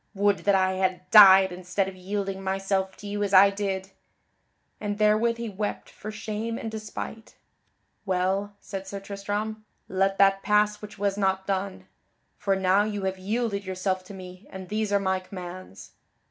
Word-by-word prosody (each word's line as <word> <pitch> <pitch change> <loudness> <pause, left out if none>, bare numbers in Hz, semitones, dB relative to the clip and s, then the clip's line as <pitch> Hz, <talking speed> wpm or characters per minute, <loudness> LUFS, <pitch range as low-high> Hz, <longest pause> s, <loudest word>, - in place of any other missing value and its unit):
Would 200 0 +2
that 200 -1 +4
I 190 0 +2
had 185 -1 -1
died 190 -3 +9
instead 185 +2 -2
of 195 - -7
yielding 195 +1 -4
myself 190 0 -1
to 205 - -9
you 205 0 -3
as 200 -1 +1
I 195 +1 +8
did." 195 -1 -3 0.9
And 205 -1 -3
therewith 215 +2 +3
he 235 0 -4
wept 210 0 -4
for 215 - -8
shame 220 +1 -4
and 225 - -5
despite. 220 +1 -7 0.7
"Well," 195 +1 -1
said 195 -1 -7
Sir 200 +1 -5
Tristram, 205 +2 -4 0.2
"let 195 +1 +1
that 195 0 +4
pass 210 0 +2
which 210 0 -10
was 200 0 -1
not 190 -1 +1
done. 195 0 -3 0.5
For 195 -1 +1
now 190 +1 +3
you 205 -1 -2
have 190 0 -2
yielded 210 +1 -2
yourself 185 0 -2
to 200 - -10
me 185 +1 -11
and 190 -1 -9
these 215 0 -1
are 200 - +3
my 190 -1 0
commands." 185 - -9
195 Hz, 170 wpm, -26 LUFS, 190-210 Hz, 0.9 s, died